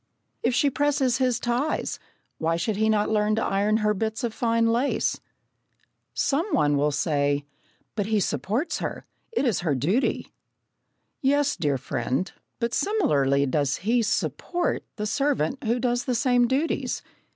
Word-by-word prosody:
If 240 Hz, +1 st, +1 dB
she 285 Hz, +1 st, +3 dB
presses 270 Hz, -3 st, +1 dB
his 250 Hz, -3 st, +2 dB
ties, 245 Hz, +6 st, -1 dB, 0.4 s
why 165 Hz, 0 st, +1 dB
should 200 Hz, +6 st, -1 dB
he 220 Hz, +2 st, +2 dB
not 210 Hz, -1 st, +2 dB
learn 210 Hz, 0 st, +2 dB
to 220 Hz, -, 0 dB
iron 205 Hz, +2 st, +2 dB
her 210 Hz, -, +3 dB
bits 220 Hz, +4 st, -3 dB
of 235 Hz, -2 st, -1 dB
fine 230 Hz, -1 st, +1 dB
lace? 235 Hz, +4 st, +1 dB, 1.0 s
Some 305 Hz, +7 st, +1 dB
one 145 Hz, -1 st, +3 dB
will 145 Hz, +1 st, +2 dB
say: 145 Hz, -1 st, 0 dB, 0.5 s
"But 205 Hz, -2 st, -2 dB
he 215 Hz, -1 st, +2 dB
supports 220 Hz, -, -1 dB
her. -, -, -4 dB, 0.3 s
It 455 Hz, -, 0 dB
is 230 Hz, -8 st, +1 dB
her 160 Hz, -5 st, 0 dB
duty." 180 Hz, -, 0 dB, 0.9 s
"Yes, 285 Hz, +1 st, +2 dB
dear 145 Hz, -4 st, 0 dB
friend, 130 Hz, +5 st, -2 dB, 0.3 s
but 235 Hz, 0 st, -2 dB
similarly 140 Hz, -, +2 dB
does 140 Hz, +1 st, +1 dB
he 235 Hz, +2 st, +3 dB
'support' 345 Hz, +9 st, -1 dB
the 210 Hz, -, -3 dB
servant 275 Hz, -, 0 dB
who 235 Hz, +2 st, +1 dB
does 245 Hz, 0 st, 0 dB
the 250 Hz, -, 0 dB
same 245 Hz, -1 st, +3 dB
duties. 275 Hz, +6 st, -1 dB
225 Hz, 150 wpm, -25 LUFS, 165-255 Hz, 1.0 s, she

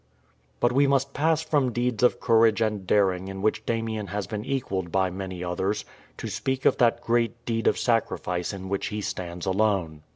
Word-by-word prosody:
But 120 Hz, -, +3 dB
we 140 Hz, +3 st, +4 dB
must 135 Hz, 0 st, +1 dB
pass 160 Hz, +2 st, +1 dB
from 145 Hz, -5 st, +1 dB
deeds 120 Hz, -1 st, -1 dB
of 125 Hz, -, +4 dB
courage 115 Hz, -1 st, +4 dB
and 105 Hz, -4 st, -1 dB
daring 95 Hz, -2 st, +2 dB
in 95 Hz, 0 st, -6 dB
which 110 Hz, -, 0 dB
Damien 110 Hz, -2 st, -2 dB
has 100 Hz, 0 st, -3 dB
been 105 Hz, +3 st, -5 dB
equalled 100 Hz, -10 st, -2 dB
by 95 Hz, 0 st, +1 dB
many 95 Hz, -1 st, -5 dB
others, 95 Hz, +3 st, -2 dB, 0.3 s
to -, -, -5 dB
speak 130 Hz, 0 st, -2 dB
of -, -, +4 dB
that 120 Hz, -2 st, +3 dB
great 120 Hz, 0 st, 0 dB
deed 115 Hz, -1 st, -1 dB
of -, -, +3 dB
sacrifice 90 Hz, -6 st, 0 dB
in 95 Hz, -2 st, -7 dB
which 100 Hz, 0 st, -2 dB
he 105 Hz, -1 st, -4 dB
stands 90 Hz, -3 st, -5 dB
alone. 95 Hz, -6 st, 0 dB
105 Hz, 190 wpm, -26 LUFS, 95-120 Hz, 0.3 s, we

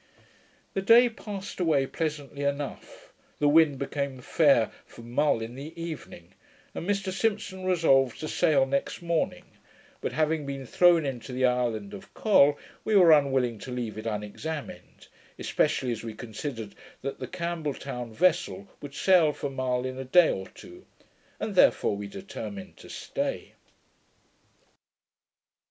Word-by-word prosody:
The 195 Hz, -, -1 dB
day 235 Hz, +5 st, +7 dB
passed 205 Hz, -4 st, -7 dB
away 155 Hz, -6 st, +2 dB
pleasantly 145 Hz, -2 st, -4 dB
enough. 140 Hz, 0 st, -4 dB, 0.2 s
The 145 Hz, -, +2 dB
wind 150 Hz, -1 st, +5 dB
became 140 Hz, -1 st, -3 dB
fair 130 Hz, -3 st, +3 dB
for 115 Hz, -, -14 dB
Mull 120 Hz, +1 st, +1 dB
in 115 Hz, +1 st, -7 dB
the 150 Hz, +6 st, -9 dB
evening, 155 Hz, -, -8 dB, 0.4 s
and 175 Hz, -, -5 dB
Mr 195 Hz, -1 st, 0 dB
Simpson 200 Hz, -2 st, -2 dB
resolved 135 Hz, -9 st, +3 dB
to 155 Hz, -, -4 dB
sail 145 Hz, -3 st, +3 dB
next 140 Hz, +5 st, -2 dB
morning: 170 Hz, -1 st, -1 dB, 0.6 s
but -, -, -2 dB
having 155 Hz, +1 st, 0 dB
been 135 Hz, -1 st, -5 dB
thrown 170 Hz, +3 st, +4 dB
into 125 Hz, -3 st, -5 dB
the 130 Hz, +1 st, +1 dB
island 125 Hz, -, 0 dB
of 195 Hz, -1 st, -10 dB
Col, 145 Hz, -9 st, +5 dB, 0.3 s
we 215 Hz, -, +1 dB
were 180 Hz, -4 st, +7 dB
unwilling 135 Hz, -6 st, +3 dB
to 130 Hz, -, -8 dB
leave 120 Hz, -3 st, -4 dB
it 110 Hz, +1 st, -6 dB
unexamined, 115 Hz, +9 st, -6 dB, 0.3 s
especially 125 Hz, -2 st, 0 dB
as 115 Hz, -, -4 dB
we 115 Hz, -2 st, -6 dB
considered 115 Hz, -1 st, -6 dB, 0.3 s
that 140 Hz, -, -4 dB
the 130 Hz, -, -5 dB
Campbell 170 Hz, -2 st, -3 dB
town 125 Hz, -4 st, -6 dB
vessel 180 Hz, -, +1 dB
would 140 Hz, -1 st, -9 dB
sail 175 Hz, -5 st, +4 dB
for 145 Hz, -1 st, -4 dB
Mull 130 Hz, -1 st, -1 dB
in 130 Hz, 0 st, -4 dB
a -, -, -3 dB
day 160 Hz, +6 st, +5 dB
or 95 Hz, 0 st, -4 dB
two, 355 Hz, +1 st, -14 dB, 0.6 s
and 215 Hz, -1 st, -3 dB
therefore 180 Hz, -, +4 dB
we 100 Hz, 0 st, -5 dB
determined 100 Hz, 0 st, -8 dB
to -, -, -13 dB
stay. -, -, -4 dB
140 Hz, 145 wpm, -27 LUFS, 125-170 Hz, 0.6 s, day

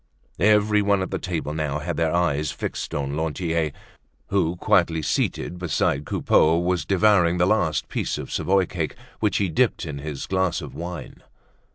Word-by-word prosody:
Everyone 105 Hz, -1 st, +3 dB
at -, -, -6 dB
the -, -, -2 dB
table 85 Hz, -4 st, -3 dB
now 75 Hz, -2 st, -2 dB
had 80 Hz, +2 st, -3 dB
their 80 Hz, 0 st, +1 dB
eyes 75 Hz, -4 st, +1 dB
fixed -, -, -5 dB
on 70 Hz, 0 st, -2 dB
Lantier 80 Hz, 0 st, -1 dB, 0.6 s
who, 90 Hz, -4 st, +1 dB
quietly 80 Hz, -2 st, +2 dB
seated 90 Hz, +4 st, -1 dB
beside 75 Hz, -4 st, 0 dB
Coupeau, 80 Hz, +2 st, +3 dB
was 90 Hz, +1 st, 0 dB
devouring 95 Hz, -3 st, +3 dB
the 90 Hz, -, +3 dB
last 95 Hz, -6 st, +1 dB
piece -, -, -2 dB
of -, -, -7 dB
Savoy 95 Hz, 0 st, +2 dB
cake -, -, -4 dB, 0.2 s
which 105 Hz, -3 st, +1 dB
he 100 Hz, -, +1 dB
dipped 95 Hz, +5 st, +1 dB
in 75 Hz, -3 st, -5 dB
his 75 Hz, -1 st, -5 dB
glass 95 Hz, -2 st, 0 dB
of -, -, -8 dB
wine. 85 Hz, -1 st, -7 dB
85 Hz, 165 wpm, -24 LUFS, 75-95 Hz, 0.6 s, Everyone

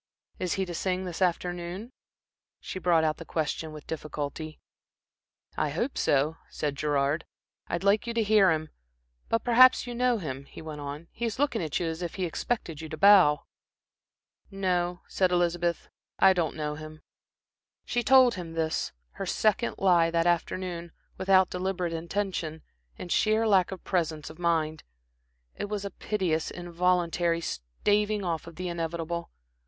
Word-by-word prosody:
Is 180 Hz, -2 st, -1 dB
he 190 Hz, -, -1 dB
to 175 Hz, -, -6 dB
sing 185 Hz, +2 st, -1 dB
this 180 Hz, 0 st, -6 dB
afternoon?" 180 Hz, +4 st, -1 dB, 0.7 s
She 185 Hz, -, -6 dB
brought 170 Hz, -3 st, +3 dB
out 155 Hz, -1 st, +1 dB
the -, -, -8 dB
question 160 Hz, 0 st, -2 dB
with 150 Hz, -1 st, -10 dB
difficulty. 155 Hz, 0 st, -5 dB, 1.0 s
"I 150 Hz, -, 0 dB
hope 235 Hz, -, -2 dB
so," 145 Hz, +3 st, +2 dB
said 145 Hz, -2 st, -3 dB
Gerard. 145 Hz, +2 st, 0 dB, 0.4 s
"I'd 170 Hz, +2 st, -2 dB
like 205 Hz, +3 st, +3 dB
you 235 Hz, -, -2 dB
to 230 Hz, -, +2 dB
hear 210 Hz, -2 st, +5 dB
him. 155 Hz, -1 st, 0 dB, 0.6 s
But 230 Hz, -, +1 dB
perhaps 255 Hz, +2 st, +6 dB
you 245 Hz, -, -5 dB
know 245 Hz, 0 st, +2 dB
him," 140 Hz, -7 st, -5 dB
he -, -, -12 dB
went 155 Hz, -2 st, -7 dB
on. 145 Hz, +3 st, -6 dB
"He 235 Hz, -, -4 dB
is 230 Hz, -, -2 dB
looking 275 Hz, -6 st, +1 dB
at 155 Hz, -3 st, -1 dB
you 175 Hz, -, -1 dB
as 165 Hz, +1 st, -3 dB
if 175 Hz, -2 st, -4 dB
he 185 Hz, -, -1 dB
expected 165 Hz, -2 st, -3 dB
you 160 Hz, -, -7 dB
to 155 Hz, -, -6 dB
bow." 185 Hz, -7 st, +6 dB, 1.1 s
"No," 180 Hz, -2 st, -1 dB
said 185 Hz, -2 st, +1 dB
Elizabeth. 175 Hz, -1 st, 0 dB, 0.3 s
"I 190 Hz, 0 st, +6 dB
don't 170 Hz, -4 st, -1 dB
know 150 Hz, -1 st, -2 dB
him." 155 Hz, +1 st, -9 dB, 0.8 s
She 240 Hz, -, 0 dB
told 255 Hz, 0 st, +6 dB
him 170 Hz, -3 st, -6 dB
this, 160 Hz, -1 st, -1 dB, 0.2 s
her -, -, -6 dB
second 220 Hz, +3 st, +1 dB
lie 175 Hz, -3 st, +4 dB
that 165 Hz, 0 st, +1 dB
afternoon, 175 Hz, 0 st, -1 dB, 0.3 s
without 190 Hz, -1 st, +4 dB
deliberate 180 Hz, -2 st, -2 dB
intention, 170 Hz, -2 st, -3 dB, 0.3 s
in 180 Hz, -, -7 dB
sheer 220 Hz, +4 st, +3 dB
lack 190 Hz, -4 st, +4 dB
of 190 Hz, -, -7 dB
presence 160 Hz, -4 st, -1 dB
of 155 Hz, -, -15 dB
mind. 160 Hz, -2 st, 0 dB, 0.7 s
It -, -, -4 dB
was 205 Hz, -1 st, -3 dB
a 200 Hz, -, -4 dB
piteous, 180 Hz, -6 st, -1 dB
involuntary 175 Hz, -1 st, 0 dB
staving 205 Hz, -, 0 dB
off 165 Hz, -2 st, -2 dB
of 170 Hz, -, -10 dB
the 185 Hz, 0 st, -4 dB
inevitable. 170 Hz, 0 st, -3 dB
175 Hz, 160 wpm, -28 LUFS, 160-195 Hz, 1.1 s, perhaps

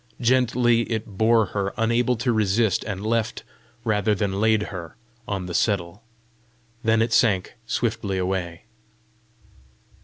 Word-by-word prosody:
Gently 120 Hz, -1 st, +2 dB
it 110 Hz, -1 st, -1 dB
bore 110 Hz, +2 st, +4 dB
her, 100 Hz, -1 st, -2 dB
unable 115 Hz, +2 st, +2 dB
to 120 Hz, +1 st, 0 dB
resist, 110 Hz, 0 st, +1 dB
and 100 Hz, -1 st, -4 dB
left 115 Hz, 0 st, -1 dB, 0.4 s
rather 105 Hz, -2 st, +1 dB
than 100 Hz, 0 st, -1 dB
laid 110 Hz, -1 st, +3 dB
her 85 Hz, 0 st, -7 dB, 0.3 s
on 95 Hz, -3 st, -3 dB
the 90 Hz, -, -6 dB
settle. 90 Hz, 0 st, 0 dB, 0.8 s
Then 110 Hz, 0 st, +3 dB
it 115 Hz, 0 st, -2 dB
sank 100 Hz, -6 st, +2 dB
swiftly 110 Hz, -5 st, -1 dB
away. 90 Hz, -2 st, -3 dB
110 Hz, 125 wpm, -24 LUFS, 95-115 Hz, 0.8 s, bore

